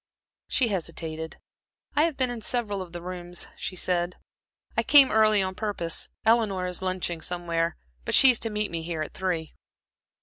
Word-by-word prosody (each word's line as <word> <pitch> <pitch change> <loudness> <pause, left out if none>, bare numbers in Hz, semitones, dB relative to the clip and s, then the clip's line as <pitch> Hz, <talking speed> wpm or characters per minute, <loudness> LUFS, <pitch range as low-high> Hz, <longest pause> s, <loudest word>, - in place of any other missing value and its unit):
She 250 -4 +2
hesitated. 160 -4 -4 0.6
"I 300 +2 +5
have 330 -4 -2
been 255 -2 +2
in 235 -2 -6
several 210 -4 -1
of 180 -2 -8
the 175 0 -7
rooms," 180 -1 -4
she 185 - -5
said. 175 0 0 0.6
"I - - +3
came 280 -3 +7
early 215 -2 +4
on 185 0 -2
purpose. 185 -5 -2 0.2
Eleanor 215 -5 +3
is 180 0 -3
lunching 185 -3 -2
somewhere, 170 -1 -2 0.3
but - - +1
she 265 - +9
is 240 - 0
to 225 - -1
meet 210 -1 -2
me 165 -1 -3
here 160 -1 -3
at - - -8
three." 175 -4 -2
185 Hz, 175 wpm, -26 LUFS, 170-220 Hz, 0.6 s, she